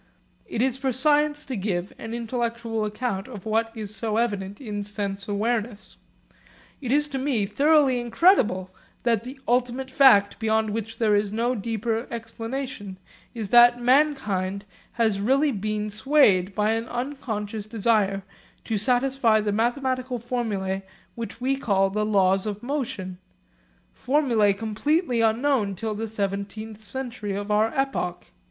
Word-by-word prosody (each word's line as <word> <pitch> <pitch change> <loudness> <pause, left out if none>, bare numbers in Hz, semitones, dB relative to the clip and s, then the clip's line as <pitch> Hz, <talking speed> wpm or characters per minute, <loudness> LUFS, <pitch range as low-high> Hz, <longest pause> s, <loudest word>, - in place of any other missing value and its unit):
It 230 - -1
is 260 0 0
for 270 -1 0
science 295 +3 +2
to 260 - -4
give 190 -3 -2
an 225 +1 -5
intellectual 235 -1 -2
account 210 -2 -3
of 215 -7 -9
what 225 +1 0
is 215 -1 -5
so 220 -1 -2
evident 205 -4 -1
in 210 -5 -4
sense 200 -1 -4
awareness. 215 +1 -2 0.8
It 250 -3 -3
is 295 +2 +3
to 270 -2 -3
me 260 -6 0
thoroughly 280 +1 +3
incredible 235 - +3 0.3
that 230 -3 +1
the 260 +3 -9
ultimate 250 +2 0
fact 225 -8 +5
beyond 220 -1 +1
which 225 +1 -4
there 215 -3 +3
is 205 0 +1
no 235 +3 0
deeper 225 +1 -2
explanation 230 -2 -6 0.4
is 220 -4 -4
that 240 +1 +7
mankind 240 -8 +1 0.3
has 220 -4 +1
really 270 +8 +2
been 210 -1 -2
swayed 205 -6 +3
by 210 0 +2
an 225 +1 -1
unconscious 225 -5 -4
desire 210 -3 +1 0.4
to 220 -3 -2
satisfy 250 -1 +2
the 210 -1 -1
mathematical 255 +3 -1
formulae 215 -6 -2 0.3
which 230 0 -7
we 265 +2 +1
call 195 -7 +1
the 210 +1 0
Laws 195 -1 +3
of 210 +2 -5
Motion, 230 -9 -4 0.7
formulae 245 -7 +2
completely 235 - 0
unknown 225 -2 +1
till 220 +3 -3
the 220 +2 -4
seventeenth 210 +1 -4
century 230 -4 -5
of 205 +1 -4
our 215 +2 +3
epoch. 270 -10 -2
225 Hz, 140 wpm, -25 LUFS, 205-255 Hz, 0.8 s, that